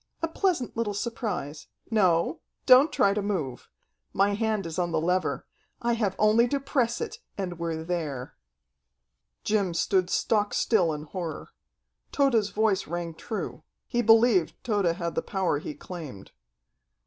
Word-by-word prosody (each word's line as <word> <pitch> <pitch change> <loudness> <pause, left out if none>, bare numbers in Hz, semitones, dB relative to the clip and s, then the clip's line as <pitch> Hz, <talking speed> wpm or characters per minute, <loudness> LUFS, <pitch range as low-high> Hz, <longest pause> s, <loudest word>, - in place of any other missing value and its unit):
A - - +3
pleasant 325 -6 -1
little 220 -3 -1
surprise. 200 - -4 0.2
No, 180 -6 +2 0.3
don't 265 +4 +7
try 200 -7 +3
to 210 - -1
move. 160 - -3 0.4
My 200 +1 +3
hand 215 -2 -1
is 165 +1 -4
on 175 -1 0
the 160 - +1
lever. 180 +3 0 0.3
I 235 0 0
have 210 -5 0
only 215 +3 +4
to 280 +3 0
press 260 - 0
it, 450 -1 -5 0.2
and 180 -3 -4
we're 165 -1 -3
there." 155 -7 -3 1.1
Jim 200 -5 0
stood 185 +1 +1
stock 210 0 +1
still 185 -8 +2
in 150 -1 -4
horror. 165 0 -6 0.6
Tode's 240 -8 +2
voice 210 -2 +1
rang 170 0 -4
true. 215 +6 -5 0.2
He 240 -1 0
believed 225 -5 +4
Tode 210 -6 0
had 170 0 -1
the - - 0
power 190 -7 -1
he 150 - -6
claimed. 145 - -9
195 Hz, 150 wpm, -27 LUFS, 170-225 Hz, 1.1 s, don't